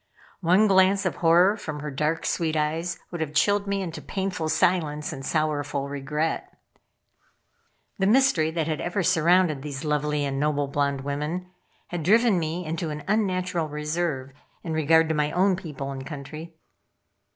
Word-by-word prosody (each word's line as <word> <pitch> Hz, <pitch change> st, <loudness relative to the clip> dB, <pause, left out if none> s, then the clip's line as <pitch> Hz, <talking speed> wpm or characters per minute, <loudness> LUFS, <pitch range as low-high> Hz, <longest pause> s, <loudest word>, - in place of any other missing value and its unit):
One 185 Hz, +4 st, +4 dB
glance 195 Hz, 0 st, +4 dB
of 185 Hz, -, -1 dB
horror 175 Hz, +4 st, +5 dB
from 155 Hz, -8 st, -6 dB
her 150 Hz, 0 st, -5 dB
dark, 150 Hz, +4 st, -1 dB
sweet 160 Hz, -2 st, 0 dB
eyes, 160 Hz, +3 st, -1 dB
would 175 Hz, -2 st, -4 dB
have 155 Hz, -1 st, -3 dB
chilled 205 Hz, +4 st, +2 dB
me 200 Hz, -1 st, -1 dB
into 165 Hz, -3 st, -6 dB
painful 190 Hz, -5 st, -3 dB
silence 155 Hz, -3 st, +1 dB
and 135 Hz, -, -7 dB
sorrowful 145 Hz, -2 st, -1 dB
regret. 145 Hz, +3 st, -3 dB, 1.4 s
The 190 Hz, -, +2 dB
mystery 225 Hz, -9 st, +4 dB
that 160 Hz, -1 st, -1 dB
had 155 Hz, -1 st, -2 dB
ever 180 Hz, +2 st, -1 dB
surrounded 170 Hz, -3 st, +3 dB
these 140 Hz, 0 st, -6 dB
lovely 150 Hz, -1 st, 0 dB
and 135 Hz, -1 st, -2 dB
noble 145 Hz, -1 st, 0 dB
blonde 140 Hz, -1 st, -1 dB
women 150 Hz, +6 st, -4 dB, 0.4 s
had 175 Hz, -1 st, -3 dB
driven 215 Hz, +3 st, +4 dB
me 165 Hz, +2 st, -3 dB
into 160 Hz, +1 st, -3 dB
an 150 Hz, 0 st, -5 dB
unnatural 185 Hz, -5 st, 0 dB
reserve 150 Hz, -2 st, -2 dB, 0.3 s
in 165 Hz, -, -3 dB
regard 160 Hz, +1 st, +4 dB
to -, -, +2 dB
my 150 Hz, -1 st, 0 dB
own 190 Hz, +1 st, +3 dB
people 150 Hz, -7 st, -6 dB
and 135 Hz, -1 st, -6 dB
country. 155 Hz, +3 st, -8 dB
160 Hz, 160 wpm, -25 LUFS, 150-180 Hz, 1.4 s, horror